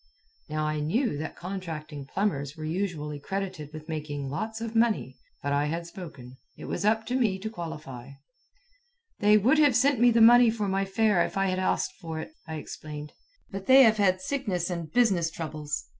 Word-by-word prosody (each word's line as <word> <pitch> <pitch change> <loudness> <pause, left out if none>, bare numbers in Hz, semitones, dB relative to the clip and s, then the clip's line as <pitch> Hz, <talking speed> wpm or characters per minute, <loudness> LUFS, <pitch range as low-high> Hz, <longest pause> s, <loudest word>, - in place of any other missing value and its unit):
Now 155 0 -1
I 155 0 -1
knew 215 - 0
that 155 - -5
contracting 160 -6 -6
plumbers 145 -6 -2
were 155 - -7
usually 155 -4 -3
credited 185 -3 -4
with 155 0 -9
making 145 -4 -4
lots 220 +9 -3
of 230 0 -5
money. 225 - +1 0.3
But 140 0 0
I 145 +1 +2
had 165 +2 -3
spoken. 140 -8 -10 0.2
It - - -9
was - - -3
up 220 +1 +2
to 250 - -2
me 220 -7 +2
to 215 +3 -5
qualify. 150 - -7 1.1
"They 210 0 +6
would 255 +9 +4
have 290 -5 +5
sent 270 +1 +3
me 245 +1 +6
the 235 0 +3
money 240 +1 +8
for 220 -2 -1
my 195 0 0
fare 195 -2 +2
if - - -4
I 195 - +2
had 185 0 -1
asked 185 - 0
for 160 -1 -5
it," 160 - -7 0.2
I 160 - -5
explained, 150 0 -8 0.4
"but 195 -1 -6
they 265 +1 +9
have 220 -2 +5
had 185 -2 +2
sickness 190 -8 -2
and 170 -3 -5
business 195 -8 +3
troubles. 155 -2 -5
180 Hz, 190 wpm, -27 LUFS, 155-220 Hz, 1.1 s, they